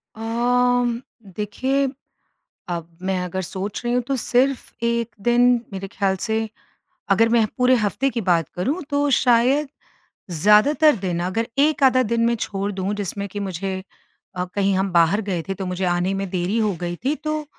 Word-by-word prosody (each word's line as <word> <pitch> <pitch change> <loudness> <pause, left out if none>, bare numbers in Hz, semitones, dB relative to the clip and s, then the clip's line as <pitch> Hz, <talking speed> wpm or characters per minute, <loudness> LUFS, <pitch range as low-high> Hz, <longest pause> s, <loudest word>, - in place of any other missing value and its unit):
अम 240 +1 +1 0.3
देखिए, 265 +7 0 0.8
अब 170 -2 -3
मैं 190 0 -1
अगर 185 +1 -3
सोच 190 +3 -5
रही 240 0 0
हूँ 250 - +2
तो 275 - 0
सिर्फ़ 255 +2 +1 0.2
1 235 0 -1
दिन 240 0 +3 0.3
मेरे 195 0 -5
ख्याल 195 -1 0
से। 220 -1 -1 0.6
अगर 230 0 +4
मैं 230 -2 +3
पूरे 250 +1 +5
हफ़्ते 230 +5 0
की 235 - -3
बात 170 -6 +1
करूँ 280 - -1
तो 285 0 +1
शायद 255 +4 +3 0.6
ज़्यादातर 215 - +5
दिन, 185 -4 -3
अगर 225 +6 -1
1 295 0 +3
आधा 255 -1 +5
दिन 230 +1 +1
मैं 235 0 +2
छोड़ 200 -1 -3
दूँ 195 +1 -2
जिसमें 200 0 -4
कि 205 - -6
मुझे 190 0 -4 0.5
अ, 180 - -1
कहीं 195 +1 0
हम 190 0 0
बाहर 170 +5 +3
गए 180 -4 -1
थे - - 0
तो 190 0 -5
मुझे 180 +1 -2
आने 175 +2 +1
में 195 -1 -3
देरी 185 +4 -1
हो 215 -2 +2
गई 175 0 -3
थी, 290 +3 +2
तो 305 0 -3
210 Hz, 175 wpm, -22 LUFS, 190-245 Hz, 0.8 s, पूरे